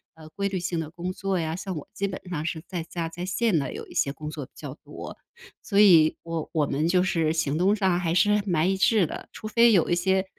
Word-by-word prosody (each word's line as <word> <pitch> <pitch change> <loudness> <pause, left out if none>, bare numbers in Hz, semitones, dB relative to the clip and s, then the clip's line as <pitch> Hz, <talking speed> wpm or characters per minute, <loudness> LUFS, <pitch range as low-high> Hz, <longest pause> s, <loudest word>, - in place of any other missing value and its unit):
呃， 160 -1 -13
规 200 0 -1
律 190 -2 -2
性 170 -2 -2
的 155 0 -7
工 180 +2 -5
作 195 -2 -2
呀， 160 0 -2
像 190 0 -5
我 145 - -8
基 200 0 -2
本 190 - -6
上 160 -4 -3
是 160 -2 -3
在 175 -3 -4
家、 165 0 -4
在 175 +2 -6
线 200 0 +1
的 140 -3 -2
有 - - -7
一 - - -13
些 140 - +1
工 150 +1 -7
作 150 -3 -6
比 - - -25
较 - - -8
多。 - - -9 0.5
所 200 - +1
以 170 -7 +6
我 165 -2 -4
我 155 -3 +1
们 150 +4 0
就 180 0 +3
是 165 -4 +1
行 155 -3 0
动 190 +4 +3
上 190 -4 +1
还 165 -2 0
是 210 +2 +3
蛮 175 -1 +1
一 195 - +1
致 195 -1 +3
的， - - -8
除 215 - -8
非 230 +2 +5
有 185 -7 +3
一 175 - +3
些， 190 +2 +1
175 Hz, 275 characters per minute, -26 LUFS, 160-195 Hz, 0.5 s, 以